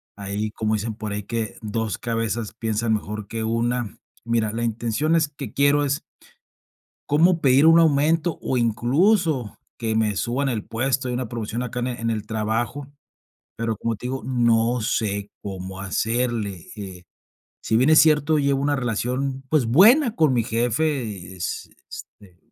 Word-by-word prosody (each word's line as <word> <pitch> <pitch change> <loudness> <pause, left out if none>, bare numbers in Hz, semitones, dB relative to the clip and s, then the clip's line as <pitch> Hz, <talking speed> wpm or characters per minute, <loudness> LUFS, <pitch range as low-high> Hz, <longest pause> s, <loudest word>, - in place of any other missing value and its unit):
Ahí 100 +2 -3
como 110 0 -1
dicen 110 +1 -3
por 110 -1 -5
ahí, 100 0 -3
que 115 0 -3
2 110 -2 -2
cabezas 115 -2 -2
piensan 110 0 -1
mejor 105 -1 -4
que 115 +1 -4
1. 115 0 -1 0.3
Mira, 115 -2 0
la 115 +1 -2
intención 115 +7 0
es 160 -2 +2
que 145 -1 -8
quiero 140 +1 +3
es 140 +1 -1 1.1
¿cómo 165 +4 +4
pedir 135 +2 +5
un 165 +1 +7
aumento?, 160 +1 +3
o 130 - -1
incluso 130 - +1 0.2
que 110 -2 -1
me 110 -2 +1
suban 130 +7 -1
el 115 -5 -2
puesto. 130 +3 -1
Hay 125 - -2
una 125 -2 -3
promoción 115 0 -4
acá 125 0 -4
en 120 - -1
el 125 -1 -4
en 115 0 -1
el-trabajo, 110 +5 -2 0.7
pero 115 -1 -2
como 115 +1 -2
te 125 - -7
digo, 130 0 -3
no 120 -1 +2
sé 100 -2 -1
cómo 95 -1 -6
hacerle. 110 -1 -2
Eh, 95 -3 -8 0.6
si 110 - +1
bien 130 +5 +4
es 155 - +6
cierto, 155 0 +4
llevo 140 -1 +1
una 145 +1 +1
relación, 130 +2 -2
pues, 150 -5 +2
buena 220 - +5
con 155 - +3
mi 120 -2 +2
jefe, 115 - -1
es 85 -2 -4 0.2
este 90 -3 -12
115 Hz, 165 wpm, -23 LUFS, 110-140 Hz, 1.1 s, un